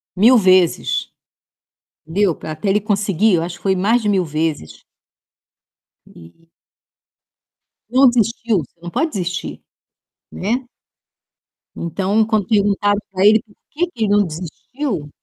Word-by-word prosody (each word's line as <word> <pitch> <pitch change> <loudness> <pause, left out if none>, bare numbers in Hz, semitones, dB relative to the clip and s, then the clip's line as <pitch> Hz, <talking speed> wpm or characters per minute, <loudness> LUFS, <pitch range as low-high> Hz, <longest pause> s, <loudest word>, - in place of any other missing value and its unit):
1.000 235 +6 +6
vezes, 185 -4 +2 1.0
entendeu, 180 +1 +1
pra 155 - -7
até 155 +6 -4
ele 205 +2 +2
conseguir, 200 -1 +1
eu 165 - +1
acho 170 +1 -5
que 175 - -21
foi 190 -1 +1
mais 225 +6 +2
de 210 - -1
1.000 190 -3 +2
vezes 155 - -4 1.2
e 85 - -18 1.4
não 260 +2 +5
desistiu. 230 -3 +1
Você 160 +3 -11
não 175 - -7
pode 320 - -1
desistir, 180 -4 -4 0.7
né. 235 +7 -2 1.1
Então, 195 +6 0
quando 215 -4 0
perguntaram 205 -1 +2
pra 190 0 0
ele 215 +1 +6
por 215 - -24 0.2
que 345 +4 -1
que 235 -10 -5
ele 205 - -2
não 205 0 +4
desistiu 175 - -5
200 Hz, 135 wpm, -19 LUFS, 175-220 Hz, 1.4 s, 1.000